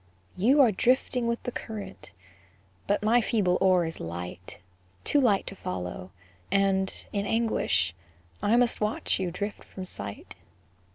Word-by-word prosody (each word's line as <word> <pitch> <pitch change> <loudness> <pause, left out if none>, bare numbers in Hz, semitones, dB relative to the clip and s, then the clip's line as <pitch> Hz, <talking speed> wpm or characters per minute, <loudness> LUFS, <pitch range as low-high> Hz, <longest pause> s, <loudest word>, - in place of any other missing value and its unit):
You 255 +10 +5
are 245 -5 +6
drifting 250 +3 +1
with 235 0 -1
the 245 - -3
current, 210 -5 -7 0.8
But 205 - +1
my 235 +3 +4
feeble 200 -6 +1
oar 185 -2 +4
is 165 - -5
light, 90 +2 -6 0.5
Too 290 - +3
light 210 -7 +3
to 195 - -5
follow; 90 - -5 0.4
and, 195 -1 +1
in 200 0 -1
anguish, 90 - +1 0.5
I 215 - +3
must 245 -2 +2
watch 210 -1 0
you 185 -2 -1
drift 205 +4 -5
from 185 - -8
sight. 100 - -7
200 Hz, 140 wpm, -28 LUFS, 175-230 Hz, 0.8 s, are